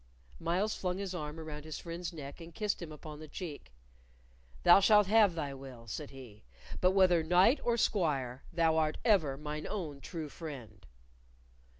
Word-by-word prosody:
Myles 190 +6 0
flung 180 -1 -2
his 195 -1 -4
arm 155 -2 -5
around 150 -2 -7
his 155 -1 -6
friend's 170 +1 -5
neck, 145 -1 -9
and 165 0 -11
kissed 210 -3 -1
him 165 -2 -6
upon 150 0 -9
the 155 - -9
cheek. 145 - -7 0.9
"Thou 175 - +8
shalt 210 +1 +6
have 205 -3 +5
thy 145 -4 -3
will," 130 -3 -10
said 140 +6 -6
he; 125 -6 -12 0.4
"but 185 +1 +3
whether 185 -3 +5
knight 180 - +4
or 235 -1 +1
squire, 140 - 0
thou 165 -1 +2
art 155 -1 +1
ever 160 - +3
mine 150 +1 -5
own 155 -9 -5
true 160 0 -5
friend." 120 - -9
160 Hz, 170 wpm, -32 LUFS, 145-185 Hz, 0.9 s, Thou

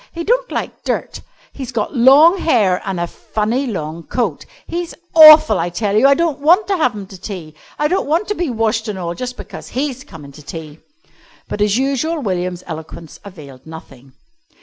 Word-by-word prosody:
He 335 - -5
don't - - 0
like - - -5
dirt. - - -3 0.3
He's 260 -3 -7
got 230 +4 -3
long 290 +9 +6
hair 210 - +2
an' 190 -2 -2
a 175 - -1
funny 220 +9 -3
long 165 -6 -5
coat. 240 +8 -3 0.2
He's 345 0 -5 0.2
awful, 310 - +8
I 170 +1 -1
tell 200 +3 -2
you. 235 +6 +5
I 280 - +5
don't 330 -2 -1
want 345 +8 +4
to 390 - +1
have 250 -8 +1
him 205 -2 -7
to 190 -1 -14
tea. 175 -7 -8 0.2
I 300 - +1
don't 370 0 -1
want 330 +7 0
to - - +1
be 350 -6 -3
washed 225 -1 -1
an' 205 - -4
all 170 -2 -4
just 250 +7 -6
because - - -10
he's 265 -1 -4
comin' 150 - -12
to 150 - -14
tea." 155 +1 -9 0.7
But 205 - -5
as 210 +1 +2
usual 275 +5 -1
William's 180 -6 -3
eloquence 160 -1 -9
availed 145 -8 -13
nothing. 135 -5 -13
220 Hz, 195 wpm, -17 LUFS, -, 0.7 s, awful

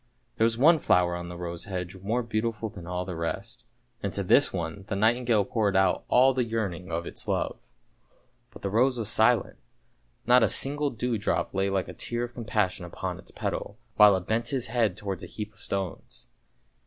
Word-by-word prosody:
There 110 - +4
was 115 0 +1
one 160 +6 +6
flower 90 -7 +3
on 85 0 -6
the 90 - -7
rose 85 +1 -4
hedge 90 -3 -5
more 110 +6 -1
beautiful 115 -1 -2
than 90 -4 -10
all 90 +1 -3
the 90 -1 -5
rest, 95 +9 -5 0.4
and 100 - -2
to 100 - -1
this 135 +9 +5
one 90 +2 -4
the 105 - -2
nightingale 115 0 +2
poured 110 -5 0
out 95 -1 +2
all 130 +2 +5
the 130 -1 +1
yearning 100 -6 -3
of 85 +1 -2
its - - -5
love. - - -1 0.9
But - - -14
the 100 - -2
rose 125 +4 +3
was 110 -4 -2
silent, - - +3 0.7
not 125 +1 +6
a 110 - +4
single 145 +7 +1
dew 120 -2 -2
drop 100 - -1
lay 95 0 +1
like 95 -1 -1
a - - -8
tear 120 0 -3
of 120 0 -6
com 120 -2 -7
passion 100 -4 0
upon 85 - -5
its - - -12
petals, 100 - -4 0.2
while 105 -2 +7
it 90 - -6
bent 115 +2 0
his 130 -4 0
head 115 -2 0
towards 100 -4 -4
a - - -7
heap 105 0 -7
of - - -18
stones. 95 -3 -5
105 Hz, 205 wpm, -27 LUFS, 95-120 Hz, 0.9 s, while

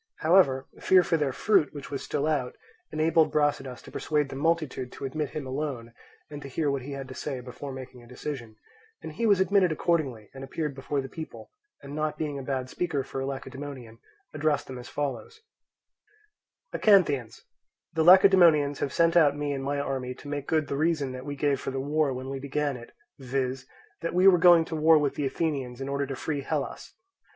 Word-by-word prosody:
However, 155 -6 +4
fear 185 -1 +5
for 170 - +1
their 150 -4 0
fruit, 185 0 +2
which 145 0 -8
was 140 - -3
still 145 - -2
out, 145 -5 -1 0.4
enabled 160 +1 +3
Brasidas 140 -4 0
to - - -12
persuade 150 -2 -1
the - - -7
multitude 150 -4 -1
to - - -6
admit 150 +2 -3
him 145 - -4
alone, 130 -4 -4 0.3
and 145 -1 -8
to 140 - -8
hear 145 +2 -1
what 140 -1 -2
he 140 +3 -7
had 135 -1 -6
to - - -7
say 135 -1 -4
before 125 +3 -8
making 130 -1 -9
a 120 - -16
decision; 125 -3 -7 0.5
and - - -6
he 230 - -1
was 200 -3 +4
admitted 190 -2 +3
accordingly 145 - -1
and 135 0 -9
appeared 150 +2 -3
before 140 +1 -3
the 135 - -7
people, 160 +4 -9 0.3
and 140 0 -8
not 155 0 -2
being 145 -3 -3
a - - -5
bad 130 -1 -3
speaker 145 -1 -2
for 135 0 -5
a 135 - -3
Lacedaemonian, 130 -3 -7 0.3
addressed 150 -1 0
them 130 -1 -8
as 120 - -10
follows: 290 - -4 1.3
"Acanthians, 145 - +3 0.5
the 160 -1 +1
Lacedaemonians 175 -6 +6
have 140 - -2
sent 165 +2 +2
out 145 -4 +5
me 145 -1 -2
and 135 -1 -4
my 140 +1 -1
army 130 -2 -3
to 145 - -12
make 145 -1 -4
good 155 -1 +1
the - - -3
reason 155 -3 0
that 130 +2 -8
we 145 - -4
gave 145 -1 +1
for - - -4
the 135 0 -3
war 145 +1 +1
when 130 +1 -5
we 135 - -4
began 140 +1 -2
it, 120 -1 -11 0.3
viz., 130 0 -3 0.3
that 165 - -3
we 185 +2 +5
were 180 -3 +7
going 170 -1 +7
to 160 - -5
war 160 +1 +5
with 145 -2 +1
the 145 - -1
Athenians 135 -5 -2
in 135 - -4
order 140 0 -1
to 135 - -4
free 145 +1 -3
Hellas. 135 - -4
145 Hz, 205 wpm, -27 LUFS, 135-155 Hz, 1.3 s, were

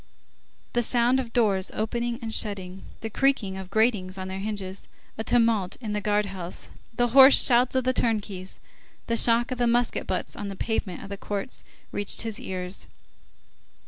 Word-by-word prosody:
The 240 - +2
sound 240 +2 +2
of 240 -3 -5
doors 200 -6 +1
opening 235 +2 -2
and 225 -1 -3
shutting, 190 -4 -2 0.2
the 225 - -4
creaking 255 -7 +1
of 190 -1 -8
gratings 205 -3 +1
on 185 0 -5
their 190 0 -5
hinges, 195 -2 -5 0.3
a 220 - -4
tumult 230 -6 +1
in 220 -4 -5
the 210 - -2
guard 210 +1 +1
house, 185 -3 -8 0.3
the 245 0 +2
hoarse 265 +2 +8
shouts 245 0 +5
of 260 - +2
the 255 +1 +1
turnkeys, 205 -6 -2 0.5
the 230 - -1
shock 235 +2 +4
of 255 - -4
musket 240 +1 0
butts - - -3
on 205 - -5
the 195 - -6
pavement 195 -3 -3
of - - -9
the 200 - -6
courts, 205 +6 -5 0.3
reached 205 +2 -1
his 225 +1 -2
ears. 185 -5 -5
215 Hz, 175 wpm, -26 LUFS, 195-240 Hz, 0.5 s, hoarse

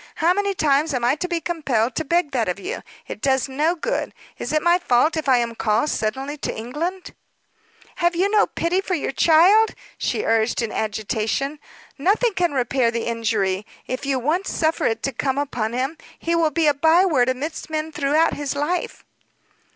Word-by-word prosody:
How 335 +2 +3
many 400 0 -1
times 295 -1 +2
am 240 -1 0
I 245 - +4
to 360 - -2
be 345 -2 -1
compelled 270 -9 -1
to 320 - -2
beg 335 0 +1
that 235 -7 0
of 180 - -3
you! - - -5 0.3
It - - -7
does 265 -1 +1
no 300 +6 0
good. 480 +9 -3 0.2
Is - - -4
it 305 0 +1
my 345 +1 +4
fault, 305 0 +2
if 310 -3 -2
I 255 - +6
am 235 -1 -1
called 225 +6 0
suddenly 265 +7 -2
to - - -3
England?" 320 +11 -4 0.8
"Have 345 -1 +1
you 370 +3 +2
no 425 0 +4
pity 350 +3 0
for 375 -1 -1
your 295 - -2
child?" 355 +10 +5 0.2
she - - -1
urged 225 +1 +1
in 225 - -3
agitation. 220 +7 -2 0.4
"Nothing 420 - +2
can 355 -3 +1
repair 255 -2 +1
the 230 0 -3
injury, 220 -4 -1 0.2
if 255 +2 -4
you 275 -1 0
once 315 +10 -1
suffer 320 0 0
it 225 - -2
to 275 - 0
come 265 +2 -2
upon 240 -6 -2
him. 265 +6 -2 0.2
He 335 - -2
will 335 -2 +3
be 320 +2 0
a 295 - +5
by 320 +6 +4
word 260 -9 +2
amidst 290 +7 -4
men 310 0 -3
throughout 305 +2 +2
his 285 -1 -3
life." 305 +5 -2
290 Hz, 195 wpm, -22 LUFS, 245-335 Hz, 0.8 s, I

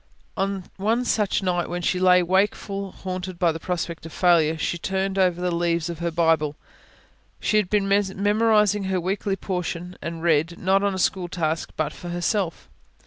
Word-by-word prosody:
On 195 -1 -1
one 225 +5 +1
such 210 -4 +1
night 175 -2 0
when 175 0 -3
she 180 +1 +1
lay 180 -1 +5
wakeful, 195 +1 0
haunted 185 -1 -6
by 170 -1 +3
the 160 - -6
prospect 170 -2 -3
of - - -12
failure, 165 -3 +3
she 170 +1 -2
turned 195 +2 -1
over 180 -2 +2
the 180 -1 -1
leaves 170 0 0
of 165 - -8
her 170 0 -1
Bible 160 -3 +2 0.8
she 215 - +1
had 205 -4 +1
been 205 -1 +1
memorising 205 +1 +2
her 190 -1 0
weekly 195 +2 -1
portion 180 -2 -4
and 165 -1 -5
read, 165 0 +2
not 195 +2 +2
as 200 -1 +1
a - - -3
school 185 0 0
task, 165 -2 -2
but 155 - -1
for 175 - -8
herself. 175 +1 -1
180 Hz, 180 wpm, -24 LUFS, 170-195 Hz, 0.8 s, lay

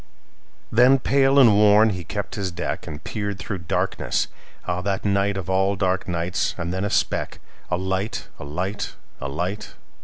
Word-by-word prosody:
Then, 125 +4 +6
pale 135 +1 +3
and 120 -6 +8
worn, 105 +1 +6
he 90 -2 -4
kept - - -4
his 100 -2 -2
deck, 85 - -4
And 75 +1 -7
peered 100 -2 -3
through 95 0 -5
darkness. 90 -6 -1 0.4
Ah, 90 0 -1
that 100 +1 -1
nightOf 100 -2 0
all 95 +1 +2
dark 95 -1 0
nights! 85 +1 -1
And 85 0 -3
then 95 +1 -2
a 105 - 0
speck—A 90 - -2
light! 95 +3 -2
A - - -7
light! 95 +8 -3 0.2
A 70 - -4
light! 90 +8 -4
95 Hz, 160 wpm, -23 LUFS, 90-105 Hz, 0.4 s, and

